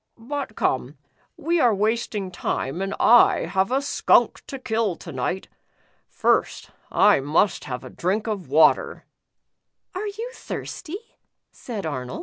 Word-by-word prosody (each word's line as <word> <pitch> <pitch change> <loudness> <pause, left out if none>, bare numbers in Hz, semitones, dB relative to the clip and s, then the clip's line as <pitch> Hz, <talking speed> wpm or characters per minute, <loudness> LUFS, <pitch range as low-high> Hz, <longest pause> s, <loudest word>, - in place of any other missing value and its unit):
"But 260 0 -5
come, 130 +2 -1 0.4
we 340 +3 0
are 240 -7 +4
wasting 210 -2 -1
time, 165 -1 -3
and 195 0 -2
I 240 0 +6
have 190 +2 0
a 270 +2 +1
skunk 285 - +2
to 275 - -6
kill 225 -6 -1
to 165 - -10
night. 140 +8 -3 0.6
First, - - 0 0.2
I - - +5
must 155 +8 +1
have 125 -3 -5
a - - -9
drink 195 +5 -1
of 205 - -4
water. 150 +3 +3 0.5
" - - -56
"Are 395 +3 -3
you 445 +4 -5
thirsty? 385 +1 -7 0.2
" - - -57
said 220 -7 -7
Arnold. 130 -5 -4
210 Hz, 145 wpm, -23 LUFS, 160-260 Hz, 0.6 s, I